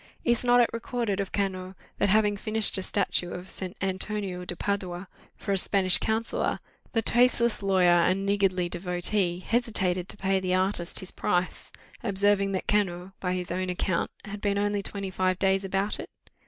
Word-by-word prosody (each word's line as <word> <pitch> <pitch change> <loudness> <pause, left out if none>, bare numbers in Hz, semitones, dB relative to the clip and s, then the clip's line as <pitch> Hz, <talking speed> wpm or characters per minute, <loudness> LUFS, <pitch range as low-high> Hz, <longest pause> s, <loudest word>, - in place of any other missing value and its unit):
"Is 240 0 +2
not 245 0 +5
it 235 - +3
recorded 230 -3 -2
of 195 -2 -3
Cano, 190 -2 -2 0.2
that - - +2
having 210 0 +3
finished 215 +1 +1
a 190 - +2
statue 185 -2 0
of 180 +1 -7
Saint 190 +1 -6
Antonio 190 -1 -3
de 175 - -5
Padua 185 -2 -3 0.3
for 200 - -4
a 195 - +2
Spanish 185 -1 +3
counsellor, 220 +1 -1 0.3
the 225 -2 +1
tasteless 235 -1 +3
lawyer 180 -3 +4
and 190 +3 +1
niggardly 195 -3 +1
devotee 180 +1 +1
hesitated 190 -6 0
to - - -4
pay 195 -1 +1
the 185 -1 0
artist 185 -2 +1
his 185 - -5
price, 180 +1 -2 0.3
observing 200 -1 +2
that 190 - -3
Cano, 190 -3 0
by 180 -1 -1
his 180 -1 -4
own 185 +1 -2
account, 180 -1 -1 0.2
had 205 0 -7
been 200 -1 0
only 205 0 0
twenty 195 -1 -4
five 185 -1 0
days 195 0 +2
about 195 +2 -1
it? - - -7
195 Hz, 175 wpm, -27 LUFS, 185-205 Hz, 0.3 s, not